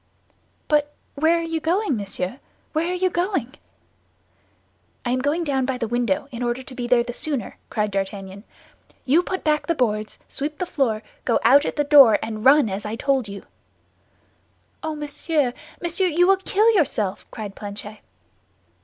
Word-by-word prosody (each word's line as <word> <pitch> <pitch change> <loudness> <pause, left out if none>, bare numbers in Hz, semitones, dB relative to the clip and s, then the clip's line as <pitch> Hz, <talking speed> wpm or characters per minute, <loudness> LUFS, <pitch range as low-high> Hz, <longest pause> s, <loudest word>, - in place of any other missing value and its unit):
"But 295 -1 +1 0.2
where 320 +4 +3
are 335 - -2
you 330 -1 -2
going, 345 - 0
monsieur, 200 +2 -4 0.3
where 315 +2 0
are 365 - -1
you 370 0 +1
going?" 345 - -1 1.5
"I 240 - 0
am 255 - +1
going 290 +6 0
down 275 -4 0
by 265 -1 -1
the 235 -2 -2
window, 240 0 0
in 240 -1 -6
order 240 +1 -1
to 260 - -10
be 245 -1 -4
there 240 -1 +4
the 240 0 -6
sooner," 275 -5 -3
cried 210 -1 -1
D'Artagnan. 195 0 -4 0.6
"You 295 +7 +4
put 375 +1 -4
back 300 -1 +1
the 335 - +1
boards, 215 -5 -1
sweep 295 +2 -4
the 365 - -2
floor, 230 -10 -1 0.2
go 235 - +2
out 275 +6 +6
at - - -2
the 295 - +1
door, 280 -7 +7
and 215 -1 -5
run 275 0 +6
as 195 0 -4
I 210 +1 -4
told 265 -1 0
you." 200 0 -8 1.4
"Oh, 315 -1 -3
monsieur! 295 -2 0 0.3
Monsieur! 345 +2 +1
You 350 +1 +3
will 390 +1 +5
kill 415 +4 +3
yourself," 250 - 0
cried 205 -3 -7
Planchet. 205 +1 -7
270 Hz, 170 wpm, -23 LUFS, 220-315 Hz, 1.5 s, door